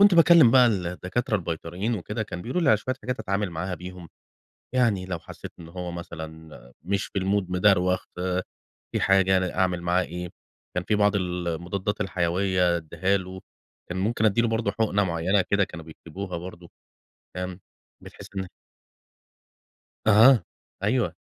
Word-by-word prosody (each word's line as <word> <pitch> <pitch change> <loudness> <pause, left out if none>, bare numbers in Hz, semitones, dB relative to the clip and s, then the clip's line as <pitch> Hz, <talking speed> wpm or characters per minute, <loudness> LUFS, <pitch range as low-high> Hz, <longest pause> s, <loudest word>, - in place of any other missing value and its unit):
كنت 200 -2 +7
باكلم 165 -6 +7
بقى 125 0 +7
الدكاترة 95 +3 -1
البيطريّين 90 +5 -3
وكده، 105 +2 -3
كان 90 -4 -7
بيقولوا 130 - -1
لي 155 - +2
على 110 - +6
شوية 130 +5 -3
حاجات 125 +1 -3
أتعامل 100 0 -1
معاها 90 +3 -3
بيهم، 90 0 -9 0.7
يعني 115 -7 +2
لو 90 -2 -4
حَسّيت - - -10
إن 85 - -10
هو 90 0 -5
مثلًا 80 -2 -8 0.3
مش 100 +3 -1
في 100 - -3
الMood، 95 -1 0
مدروخ، 90 -1 +3 0.9
في - - 0
حاجة، 95 -1 +4
أنا 95 -1 -1
أعمل 90 -2 +1
معاه 90 +1 +2
إيه، 90 +1 -6 0.4
كان 90 - -1
في 105 - +1
بعض 105 0 +3
ال 90 -2 -2
المُضادّات 90 +5 -3
الحيوية 90 -1 +1
أدّيها 85 +4 0
له، 95 0 -6 0.5
كان 90 - -4
ممكن 110 +3 0
أدّي 110 +2 +4
له 115 - +2
برضه 110 -2 0
حقنة 100 -1 +1
مُعيّنة 90 +3 +1
كده 100 0 +4
كانوا 85 -3 -10
بيكتبوها 85 +3 -7
برضه، 90 0 -10 0.7
فاهم، 90 0 -4 0.4
بتحِسّ - - -11
إن 95 -1 -2 1.6
أها، 110 +4 +7 0.4
أيوه، 115 +3 +1
95 Hz, 155 wpm, -25 LUFS, 90-105 Hz, 1.6 s, كنت